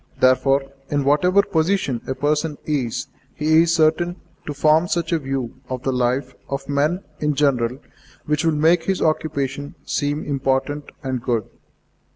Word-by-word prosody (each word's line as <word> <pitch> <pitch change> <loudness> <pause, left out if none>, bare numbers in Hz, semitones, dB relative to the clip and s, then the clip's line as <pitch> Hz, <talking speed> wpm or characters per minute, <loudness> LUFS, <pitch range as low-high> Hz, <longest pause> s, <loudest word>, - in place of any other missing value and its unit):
Therefore, 135 +2 +4 0.3
in 145 -1 +1
whatever 180 +8 +4
position 165 - 0
a 130 - -2
person 150 +2 0
is, 135 -7 -1 0.3
he 155 +2 +4
is 170 0 +2
certain 165 +2 +2 0.3
to 145 - -2
form 155 +4 +4
such 170 -2 -1
a 165 - +2
view 135 -3 -4
of 130 -1 -4
the 135 - 0
life 125 +1 0 0.2
of 140 0 -4
men 150 +6 0 0.2
in 150 -1 0
general 130 -4 +1 0.5
which 150 0 0
will 165 - +3
make 165 +2 +3
his 190 0 0
occupation 145 -3 -1
seem 145 +1 -1
important 135 +1 -1 0.2
and 130 -2 -2
good. 115 -3 -1
145 Hz, 155 wpm, -21 LUFS, 135-160 Hz, 0.5 s, Therefore